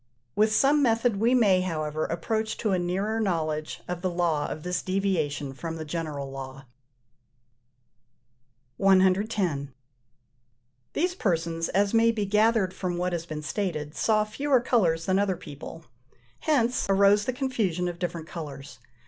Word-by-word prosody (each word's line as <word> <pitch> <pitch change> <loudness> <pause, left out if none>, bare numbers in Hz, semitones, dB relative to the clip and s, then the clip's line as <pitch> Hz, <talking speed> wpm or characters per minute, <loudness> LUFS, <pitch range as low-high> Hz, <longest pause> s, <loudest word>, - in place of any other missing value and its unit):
With 215 +1 +3
some 280 +6 +4
method 230 -3 +2
we 235 +5 +3
may, 200 -7 +4
however, 155 -3 -2
approach 220 +7 -2
to 215 - -1
a 185 - +2
nearer 195 +5 -1
knowledge 155 -6 -2
of 180 -1 -4
the 185 - 0
law 170 -4 0
of 155 - -6
this 180 0 -1
deviation 165 -8 -1
from 165 +4 -5
the 160 -1 -6
general 150 -4 -4
law. 135 0 -8 2.1
110. 190 -6 +2 1.2
These 360 +3 0
persons, 165 - -1
as 200 +2 +1
may 230 0 +5
be 215 -3 -2
gathered 210 -1 +2
from 180 -2 -3
what 180 0 -1
has 170 -1 -3
been 150 -1 -5
stated, 155 -4 -3
saw 215 -1 +2
fewer 265 +5 +1
colours 175 -10 +1
than 190 +1 +2
other 195 -3 0
people: 155 +2 -10 0.5
hence 250 -6 +1
arose 200 +1 +4
the - - 0
confusion 220 - -1
of 175 -1 -5
different 170 -2 -3
colours. 145 -5 -8
185 Hz, 145 wpm, -27 LUFS, 160-215 Hz, 2.1 s, may